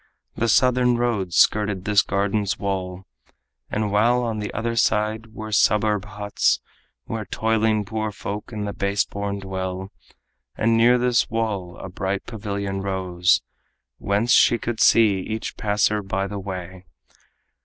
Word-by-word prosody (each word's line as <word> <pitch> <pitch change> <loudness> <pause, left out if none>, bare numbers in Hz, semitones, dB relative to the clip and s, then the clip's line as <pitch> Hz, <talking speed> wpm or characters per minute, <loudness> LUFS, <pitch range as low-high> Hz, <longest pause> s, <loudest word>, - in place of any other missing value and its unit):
The 115 - 0
southern 125 +1 +3
road 110 -7 -1
skirted 105 +1 +2
this 105 -1 +4
garden's 100 0 -1
wall, 95 -1 -4 0.6
While 110 +4 +2
on 115 -2 -2
the 105 - -4
other 115 +1 -2
side 110 0 0
were 110 0 -6
suburb 105 0 +2
huts 105 -1 0 0.5
Where 110 -1 -4
toiling 110 -1 +1
poor 110 +1 -3
folk 105 +1 -6
and 105 -2 -4
the 100 - -4
base 100 0 0
born 100 0 -4
dwell. 95 0 -5 0.7
And 115 +1 +2
near 120 +2 +5
this 125 -1 +2
wall 105 -6 -3
a - - -7
bright 95 +2 -3
pavilion 100 -3 -4
rose, 95 -2 +1 0.6
Whence 105 +4 0
she 120 - +5
could 115 0 -4
see 105 -4 +5
each 110 +4 -5
passer 105 0 +1
by 95 0 -2
the 100 +1 -5
way. 95 -1 -7
105 Hz, 140 wpm, -23 LUFS, 95-110 Hz, 0.7 s, near